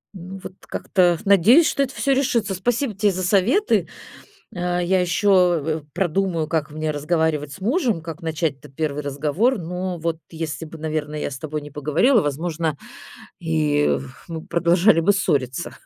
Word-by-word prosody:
Ну, 185 +1 -8
вот - - -8
как-то 175 -3 +1
надеюсь, 205 - +6
что 280 - 0
это 270 0 -1
всё 275 - +1
решится. 235 -7 +1
Спасибо 235 +5 -1
тебе 200 +1 +2
за 185 0 -3
советы. 215 - +2 0.7
А, 175 0 -1
я 185 +2 +2
ещё 180 -1 +3
в 150 - -6
в 145 -1 -29
продумаю, 180 -3 0
как 155 -3 -1
мне 155 +1 -3
разговаривать 150 -1 -1
с 195 - -11
мужем, 230 - 0
как 165 +1 -7
начать-то 160 -3 -3
1 150 +1 -3
разговор, 150 - 0
но 180 +1 -4
вот 165 0 -2
если 160 -1 -5
бы, 160 +1 -10
наверное, 155 -1 -3
я - - -2
с 135 - -6
тобой 155 0 -4
не 145 0 -10
поговорила, 165 - +3
возможно, 155 +1 -2 0.6
и 155 -3 +1
в 135 0 -12
мы 160 -1 -6
продолжали 170 +2 +3
бы 190 +5 +4
ссориться. 140 -10 -1
170 Hz, 165 wpm, -22 LUFS, 155-195 Hz, 0.7 s, надеюсь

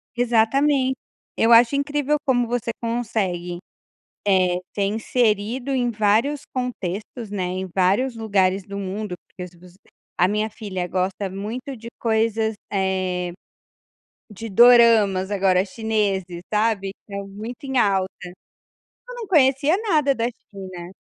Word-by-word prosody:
Exatamen 255 +3 +2 0.4
eu 225 - +3
acho 235 +3 +7
incrível 290 +1 0
como 245 -2 +2
você 240 -1 -2
consegue, 205 -7 -2 0.7
eh, 185 -3 +3 0.2
ser 200 - 0
inserido 225 +3 0
em 245 -2 +1
vários 225 +6 +1
contextos, 220 -2 -4
né. 200 -3 -3
Em 185 +1 -4
vários 200 +7 +2
lugares 195 -3 +1
do 200 +1 -7
mundo, 200 0 -4
porque 180 - -10 0.2
os 180 -1 -15 0.4
a 180 - +4
minha 210 +2 0
filha 190 -4 -5
gosta 190 +2 -2
muito 230 +8 -6
de 230 0 -10
coisas, 220 -1 +1 0.2
eh, 185 -2 -1 1.0
de 220 +2 -8
doramas, 220 -4 +5
agora 190 -2 +3
chineses, 195 -4 -2
sabe. 210 -2 +1 0.2
Tá 200 - -8
muito 215 +6 -8
em 265 -1 -2
alta. 195 -4 +2 1.0
Eu - - -7
não 470 -2 -6
conhecia 285 -2 +3
nada 295 -4 +3
da 230 -2 -2
China. 190 -6 -9
215 Hz, 125 wpm, -22 LUFS, 190-245 Hz, 1.0 s, acho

